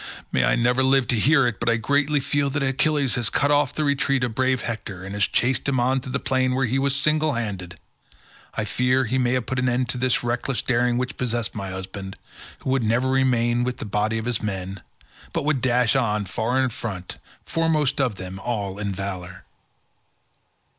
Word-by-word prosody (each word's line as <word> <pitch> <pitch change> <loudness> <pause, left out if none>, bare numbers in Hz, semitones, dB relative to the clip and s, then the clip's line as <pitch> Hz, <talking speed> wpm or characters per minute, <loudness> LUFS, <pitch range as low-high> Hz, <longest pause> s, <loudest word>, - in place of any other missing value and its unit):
May 65 - +2
I - - +3
never 125 +2 +2
live 130 -1 +3
to 120 - +3
hear 140 +3 +4
it, 120 -4 -1
but 120 - 0
I 115 - +3
greatly 140 +5 +2
fear 140 +1 0
that 145 +1 -1
Achilles 135 0 +1
has 120 -4 0
cut 145 +7 +1
off 145 -2 +3
the 155 - 0
retreat 140 -2 +1
of 120 -2 -1
brave 130 +1 +1
Hector 105 -5 -5
and 95 +1 -6
has 100 -1 +2
chased 130 +3 +1
him 130 -2 +1
on 130 +2 +2
to 130 0 -8
the 135 - 0
plain 130 -1 +1
where 130 0 +2
he 130 +3 0
was 140 0 +1
single 155 +1 +2
handed; 95 -8 -4 0.8
I 110 - -1
fear 125 +4 +2
he 130 +3 0
may 125 -1 +2
have 125 -2 0
put 130 - -2
an 130 0 +2
end 125 +1 0
to 125 - -3
the 130 0 +2
reckless 120 +2 -1
daring 120 -1 +1
which 125 0 -3
possessed 120 -3 -2
my 95 -3 -5
husband, 95 +1 -6 0.5
who 130 - -2
would 135 -2 +1
never 120 +4 +1
remain 120 -2 +2
with 125 0 -2
the - - -6
body 105 +2 0
of 110 - -4
his 120 -2 -1
men, 95 -2 -4 0.5
but - - -1
would 150 -4 +1
dash 125 0 +2
on 105 -5 +1
far 120 +6 -1
in 130 -1 +2
front, 95 -5 -6 0.3
foremost 155 -4 +1
of 125 -6 0
them 95 0 -7
all 100 -4 -3
in 100 -1 -2
valour." 95 -2 -6
125 Hz, 210 wpm, -23 LUFS, 110-135 Hz, 0.8 s, hear